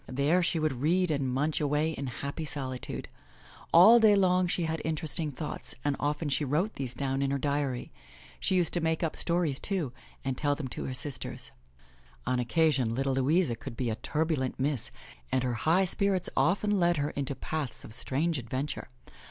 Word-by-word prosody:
There 140 +7 +2
she 170 -1 +1
would 155 -6 -1
read 180 +3 +2
and 140 -3 0
munch 145 +5 0
away 150 +2 +1
in 140 -3 -4
happy 140 +5 -5
solitude. 135 -4 -3 0.6
All 215 +8 +9
day 215 -2 +6
long 185 -2 +3
she 175 0 0
had 160 -1 -2
interesting 160 0 -1
thoughts 150 +3 -5
and 145 -1 +2
often 145 +2 -1
she 145 +1 +1
wrote 155 +10 0
these 130 -3 -4
down 135 -1 -1
in 140 - +1
her 140 - 0
diary. 140 -3 -1 0.5
She 190 - +1
used 175 -3 +2
to 175 - +3
make 160 +1 0
up 160 - -1
stories, 170 -5 0
too, 175 -11 -2 0.3
and 135 -1 -1
tell 145 +1 +1
them 140 -3 -5
to - - -5
her 130 - -3
sisters. 140 0 -2 0.7
On 125 - +1
occasion, 130 -2 +2
little 135 +1 0
Louisa 135 +1 +2
could 115 0 -9
be 120 -3 -1
a - - -1
turbulent 150 +2 -1
miss 135 -3 -1 0.4
and 130 -1 +1
her 125 -1 0 0.2
high 185 +4 +5
spirits 190 0 +1
often 205 +3 +2
led 175 -1 +3
her 145 +1 -1
into 140 -1 -3
paths 150 -6 -4
of 110 - -10
strange 150 +6 0
adventure. 130 +5 -4
145 Hz, 185 wpm, -29 LUFS, 135-170 Hz, 0.7 s, All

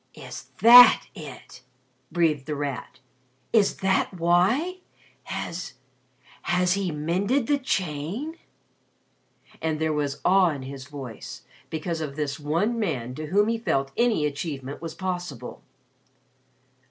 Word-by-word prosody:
"Is - - -9 0.2
that 245 +1 +10
it!" 135 -4 -11 0.5
breathed 155 -5 +1
The 150 - -2
Rat. 140 -3 -5 0.6
"Is 215 -4 +3
that 190 0 +2
why? 190 - +2 0.5
Has 170 -4 -5 0.7
has 180 0 +2
he 195 -1 -1
mended 185 - 0
the 285 +3 +1
chain?" 190 - -3 1.2
And 160 -1 -1
there 160 0 0
was 145 -2 -2
awe 185 -1 +5
in 140 -4 -5
his 135 0 -8
voice, 135 -6 -8 0.3
because 160 +1 -3
of 145 -3 -5
this 145 -2 -3
one 170 +11 0
man 130 - -2
to 155 +3 -6
whom 205 +6 +3
he 230 0 0
felt 135 -11 0
any 235 -10 +2
achievement 140 -2 -4
was 165 -1 -6
possible. 180 -9 -5
165 Hz, 125 wpm, -25 LUFS, 145-195 Hz, 1.2 s, that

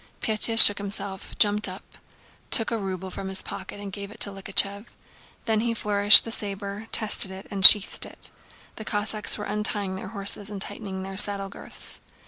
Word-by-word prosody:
Pétya 225 0 -1
shook 205 -2 +9
himself, 200 -1 -5
jumped 210 0 +1
up, - - -11 0.7
took 225 - +2
a 230 - -3
ruble 190 -1 -8
from 195 - -8
his 190 0 -5
pocket 195 +1 -11
and 200 -1 -10
gave 200 0 -9
it 210 - -16
to 200 - -1
Likhachëv; 200 +2 0 0.6
then 220 -2 -2
he 230 +1 -3
flourished 205 -1 +5
the 230 - -8
saber, 200 0 -5
tested 210 -3 +2
it, 190 +1 -12
and 195 -1 -6
sheathed 205 +1 +7
it. - - -1 0.5
The 220 - -9
Cossacks 210 0 -2
were 210 - -8
untying 205 -2 -4
their - - -10
horses 200 -1 -2
and 205 -2 -9
tightening 190 -1 -8
their 195 0 -10
saddle 200 -1 +2
girths. - - -7
205 Hz, 180 wpm, -22 LUFS, 195-210 Hz, 0.7 s, shook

